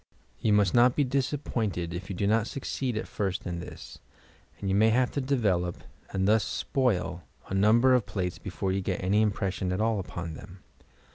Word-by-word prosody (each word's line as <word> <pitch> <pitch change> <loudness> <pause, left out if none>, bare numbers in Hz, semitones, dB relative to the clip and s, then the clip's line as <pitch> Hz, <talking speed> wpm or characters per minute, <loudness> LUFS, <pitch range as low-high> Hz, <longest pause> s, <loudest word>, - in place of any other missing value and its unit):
Ton 105 -2 +3
must 100 -3 +3
not 120 +1 +5
be 145 - +3
disappointed 125 - -1
if 90 +1 -6
you 95 - -3
do 100 - -1
not 110 +2 +2
succeed 130 -3 -3
at 110 - -3
first 95 -3 -3
in 85 -2 -3
this, - - -10 0.6
and 100 - -4
you 95 - +1
may 110 +3 +5
have 125 +2 +2
to 140 - -2
develop 100 -10 0 0.3
(and 95 0 0
thus 110 0 +4
spoil) 95 -11 -1 0.3
a - - -4
number 110 +6 +5
of 125 -4 +2
plates 90 -3 -3
before 95 0 -3
you 95 +1 0
get 95 -1 -2
any 100 +3 +3
impression 100 -3 -1
at 90 - -1
all 110 -1 +1
upon 85 -3 -5
them. 90 +4 -12
100 Hz, 195 wpm, -28 LUFS, 95-120 Hz, 0.6 s, not